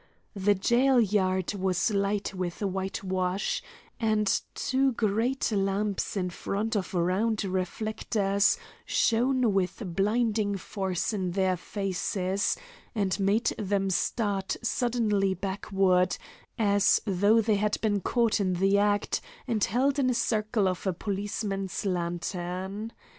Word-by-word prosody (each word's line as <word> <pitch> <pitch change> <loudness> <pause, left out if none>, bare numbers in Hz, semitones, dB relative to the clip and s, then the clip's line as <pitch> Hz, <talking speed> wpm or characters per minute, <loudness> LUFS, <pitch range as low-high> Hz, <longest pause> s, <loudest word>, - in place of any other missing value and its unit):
The 205 0 +2
jail 245 +6 +3
yard 190 -3 +1
was 190 0 0
light 200 0 0
with 185 +1 -4
whitewash, 190 -1 -1 0.4
and 215 -2 +2 0.3
two 265 0 +1
great 225 +4 0
lamps 200 0 -1
in 180 -2 -1
front 215 +6 -2
of 195 -2 -2
round 195 +6 +1
reflectors 200 +1 0 0.3
shone 245 -1 +2
with 190 +3 -1
blinding 210 0 +1
force 190 +1 -2
in 185 -4 -2
their 190 -1 +2
faces, 190 +1 -1 0.4
and 195 -2 0
made 200 +4 +2
them 195 -1 0
start 200 0 -1
suddenly 220 -6 +1
backward, 190 -1 +1 0.4
as 205 -2 +4
though 205 +3 +3
they 215 -1 +2
had 210 +1 0
been 205 -2 +1
caught 230 +2 +1
in 185 -2 +1
the 195 +3 +3
act 205 0 +1 0.3
and 225 -5 0
held 270 +6 +1
in 265 - +2
the 250 - +1
circle 215 -3 +1
of 185 +1 -2
a 190 - +1
policeman's 195 0 -3
lantern. 180 +3 -3
200 Hz, 120 wpm, -28 LUFS, 190-220 Hz, 0.4 s, as